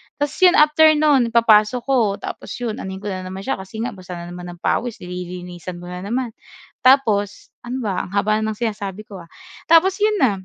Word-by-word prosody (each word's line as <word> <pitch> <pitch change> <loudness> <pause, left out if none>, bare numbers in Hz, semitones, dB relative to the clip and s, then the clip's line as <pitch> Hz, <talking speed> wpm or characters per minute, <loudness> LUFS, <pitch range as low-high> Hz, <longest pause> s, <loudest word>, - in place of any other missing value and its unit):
Ta's 290 0 -3
'yon 365 -1 +6
after 300 0 +5
no'n, 295 -5 +3
ipapasok 225 0 +4
ko 270 0 +1 0.2
tapos - - -7
'yon 230 -3 -3
anohin 190 0 -6
ko 205 - -3
na 185 -1 -5
naman 190 +1 -7
siya 270 - -2
kasi 195 +4 -7
nga 240 - -2
basa 185 -2 -10
na 170 0 -8
naman 175 0 -8
ng 175 - -16
pawis, 240 -2 -1
di 180 - -9
lilinisan 180 0 -7
mo 175 - -9
na 180 +1 -7
naman. 245 +4 -2 0.6
Tapos 215 -7 +3 0.2
ano 255 +2 -4
ba, 200 -4 -2
ang 185 - -12
haba 215 +1 +2
na 220 0 -1
ng - - -15
sinasabi 205 -3 -3
ko, 195 -3 -9
ah. - - -26 0.4
Tapos 335 +4 +5
'yon 425 +1 +2
na, 260 - +5
215 Hz, 220 wpm, -20 LUFS, 185-260 Hz, 0.6 s, yon